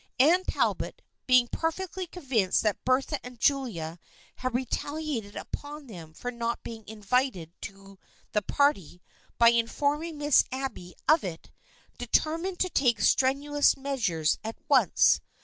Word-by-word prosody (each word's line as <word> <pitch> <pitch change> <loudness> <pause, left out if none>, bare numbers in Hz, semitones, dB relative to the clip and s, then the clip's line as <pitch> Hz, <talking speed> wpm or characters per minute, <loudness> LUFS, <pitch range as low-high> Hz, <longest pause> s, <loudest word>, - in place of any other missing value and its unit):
Anne 335 +8 +5
Talbot, - - -1 0.2
being 250 -1 +5
perfectly 360 +5 -3
convinced 255 - 0
that 215 -2 0
Bertha 265 +3 0
and 250 -1 -10
Julia 195 - 0 0.4
had 255 -1 -3
retaliated 260 -3 -3
upon 290 0 -7
them 170 -10 -10
for 245 - -5
not 235 -1 -3
being 225 -1 -8
invited 210 - -1
to 195 -1 -10 0.3
the 210 - +1
party 200 - +1 0.4
by 235 0 +7
informing 290 +7 0
Miss 290 -1 +4
Abby 260 -9 -5
of 310 +1 +5
it, 170 -4 -7 0.5
deter 315 +1 +1
mined 370 +1 -4
to 370 - +2
take 240 -5 +2
strenuous 285 +2 +3
measures 205 - 0
at 220 +1 -5
once. 260 - +4
255 Hz, 130 wpm, -28 LUFS, 210-290 Hz, 0.5 s, by